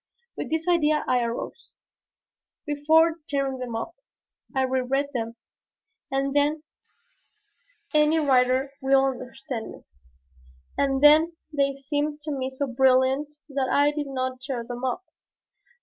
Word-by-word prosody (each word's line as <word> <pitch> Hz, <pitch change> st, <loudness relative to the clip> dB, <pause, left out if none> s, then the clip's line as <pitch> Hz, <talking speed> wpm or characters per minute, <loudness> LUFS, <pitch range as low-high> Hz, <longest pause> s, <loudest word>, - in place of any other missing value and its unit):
With -, -, -5 dB
this 320 Hz, +2 st, -2 dB
idea 310 Hz, -3 st, +3 dB
I 250 Hz, -1 st, +3 dB
arose. 235 Hz, 0 st, -5 dB, 0.9 s
Before 315 Hz, +3 st, +3 dB
tearing 275 Hz, -2 st, -1 dB
them 245 Hz, -2 st, -5 dB
up, 230 Hz, +9 st, -4 dB, 0.6 s
I 265 Hz, -, +2 dB
reread 260 Hz, +2 st, 0 dB
them. 230 Hz, -2 st, -3 dB, 0.7 s
And 275 Hz, +1 st, -1 dB
then 295 Hz, +2 st, +2 dB, 1.3 s
any 305 Hz, +1 st, +4 dB
writer 265 Hz, -2 st, +2 dB
will 270 Hz, 0 st, +4 dB
understand 255 Hz, -2 st, -5 dB
me -, -, -13 dB, 0.9 s
and 270 Hz, 0 st, 0 dB
then 310 Hz, +3 st, +7 dB, 0.2 s
they 275 Hz, -1 st, +1 dB
seemed 295 Hz, +1 st, -1 dB
to 305 Hz, -, -4 dB
me 260 Hz, -2 st, -2 dB
so 265 Hz, +2 st, -3 dB
brilliant 265 Hz, +3 st, +2 dB
that 270 Hz, -2 st, -1 dB
I 290 Hz, +1 st, +4 dB
did 295 Hz, -1 st, -4 dB
not 260 Hz, -1 st, -3 dB
tear 260 Hz, -3 st, -4 dB
them 245 Hz, +1 st, -7 dB
up. 260 Hz, +8 st, -2 dB
275 Hz, 130 wpm, -25 LUFS, 260-295 Hz, 1.3 s, then